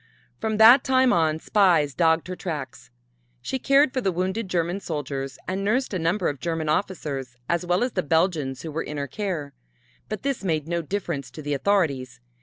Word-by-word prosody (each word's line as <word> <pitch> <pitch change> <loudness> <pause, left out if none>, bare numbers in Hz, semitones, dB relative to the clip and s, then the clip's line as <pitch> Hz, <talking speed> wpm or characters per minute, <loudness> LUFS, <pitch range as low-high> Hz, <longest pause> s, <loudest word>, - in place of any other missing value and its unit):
From 220 -1 -1
that 230 +5 +8
time 260 -1 +3
on 160 -2 +2
spies 170 -8 +3
dogged 160 +5 +2
her 185 - -4
tracks. 150 -9 -6 0.5
She 265 - -2
cared 275 +1 +4
for 255 - 0
the 195 - +1
wounded 190 +4 -2
German 175 +1 0
soldiers 140 -6 -4
and 190 +1 -2
nursed 230 +4 0
a 185 - -1
number 170 +4 0
of 145 - -3
German 165 -2 -2
officers, 145 -8 -2
as 170 +1 -1
well 180 +5 +2
as 250 - -1
the 185 - 0
Belgians 160 -5 0
who 160 - -5
were 160 +2 -2
in 150 - -6
her 140 - -2
care, 155 -3 -4 0.6
but 215 - -5
this 275 -6 -2
made 160 -5 -1
no 170 0 -1
difference 165 -6 -4
to 140 +5 -10
the 145 0 -2
authorities. 140 - 0
170 Hz, 195 wpm, -24 LUFS, 150-200 Hz, 0.6 s, that